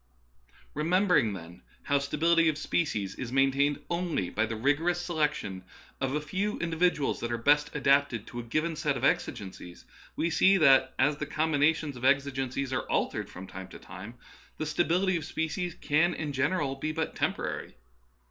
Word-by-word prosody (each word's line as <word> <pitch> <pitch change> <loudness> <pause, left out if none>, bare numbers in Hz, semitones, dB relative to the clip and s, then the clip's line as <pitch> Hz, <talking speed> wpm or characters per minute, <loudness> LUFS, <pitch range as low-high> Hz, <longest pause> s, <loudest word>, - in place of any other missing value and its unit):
Re 150 - -2
membering, 180 - +3
then, 85 0 -11 0.2
how 140 0 +2
stability 165 +4 +3
of 150 - -2
species 110 - -1
is 125 +1 -6
main 135 +1 +3
tained 140 +2 0
only 170 - -1
by 110 +1 0
the 115 - -4
rigorous 145 +9 +1
selection 150 - -2 0.4
of 135 +1 -1
a - - +1
few 190 +8 -2
in 170 0 -3
dividuals 165 -3 +1
that 120 - -3
are 120 - 0
best 145 +4 +3
adapted 140 -6 +2
to 120 - -7
a - - -5
given 155 +8 -1
set 150 -3 -1
of 125 - -7
exigencies, 95 -8 -2 0.3
we 170 - 0
see 190 +4 +5
that, 135 -5 +5
as 145 +2 +2
the - - -4
combinations 155 -1 +1
of 125 - -10
exigencies 135 -1 0
are - - -2
altered - - -1
from 95 - -9
time 95 0 -9
to - - -11
time, 95 +6 -10 0.4
the 155 - -3
sta 155 +3 +1
bility 185 +2 +2
of 165 - -5
species 160 +3 -3
can 165 +4 +1
in 150 -2 -4
general 140 0 0
be 155 +3 -3
but 160 +1 -3
temporary. - - -3
145 Hz, 180 wpm, -29 LUFS, 130-165 Hz, 0.4 s, see